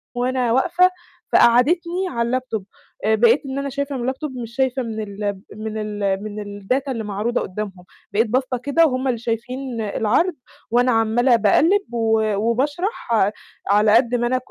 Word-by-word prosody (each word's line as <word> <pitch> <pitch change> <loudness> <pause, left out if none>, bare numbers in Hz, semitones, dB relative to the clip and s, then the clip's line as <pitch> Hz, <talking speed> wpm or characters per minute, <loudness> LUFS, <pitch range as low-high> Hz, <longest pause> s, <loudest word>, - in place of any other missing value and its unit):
وأنا 250 -1 0
واقفة، 360 +8 +4 0.4
فقعدِّتني 340 +10 +3
على 235 -1 -1
اللابتوب، 245 -5 -2 0.4
آآ 220 0 +4
بقيت 235 +6 +4
إن 270 0 -4
أنا 280 - -3
شايفة 280 +1 -3
من 250 - -3
اللابتوب 260 +3 -3
مش 235 -1 -7
شايفة 260 -1 0
من 220 -1 -5
ال 200 -1 -4
من 215 0 -5
ال 205 -2 -2
من 205 -1 -7
الdata 265 +7 -1
اللي 230 -4 -3
معروضة 210 +4 -1
قُدّامهم، 190 -2 -6 0.3
بقيت 225 +3 +2
باصّة 255 +2 0
كده 285 +7 +3
وهم 260 -2 -1
اللي 245 -3 0
شايفين 240 +1 -4
العَرْض، 225 - +1 0.4
وأنا 245 +1 +3
عمالة 230 +2 +3
باقلِّب 310 - +2
و 220 -2 +1
وباشرح 270 - -1 0.6
على 210 +2 +5
قد 240 0 +3
ما 240 0 +1
أنا 255 +1 +1
240 Hz, 160 wpm, -21 LUFS, 215-265 Hz, 0.6 s, على